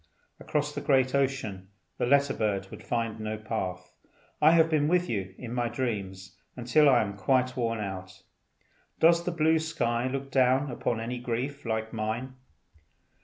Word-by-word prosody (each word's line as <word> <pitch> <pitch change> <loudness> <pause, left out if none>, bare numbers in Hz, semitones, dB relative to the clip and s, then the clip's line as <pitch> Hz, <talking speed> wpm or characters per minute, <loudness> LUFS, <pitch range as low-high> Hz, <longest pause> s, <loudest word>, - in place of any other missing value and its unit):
Across 150 0 -2
the - - -4
great 130 -2 +2
ocean, 130 -9 -1 0.3
the - - +1
letter 140 +1 +4
bird 100 -3 -2
would - - -9
find 115 -2 -2
no 110 0 -3
path. 95 -5 -4 0.5
I 150 - +7
have 165 -1 +5
been 155 -2 +1
with 180 +2 +2
you 95 - -3
in 120 -2 -7
my 120 -1 0
dreams 95 -8 -4 0.2
until 130 +5 +4
I 125 -4 +5
am 100 -1 -5
quite 130 +4 +1
worn 115 -2 -1
out. 95 -2 -6 0.8
Does 170 +1 +5
the 180 - -2
blue 160 -1 +3
sky 120 -6 -1
look 135 +1 -4
down 130 +1 +3
upon 120 -1 -2
any 120 +2 -4
grief 125 +4 -4
like 110 0 -2
mine? 115 +4 -3
125 Hz, 165 wpm, -28 LUFS, 110-140 Hz, 0.8 s, I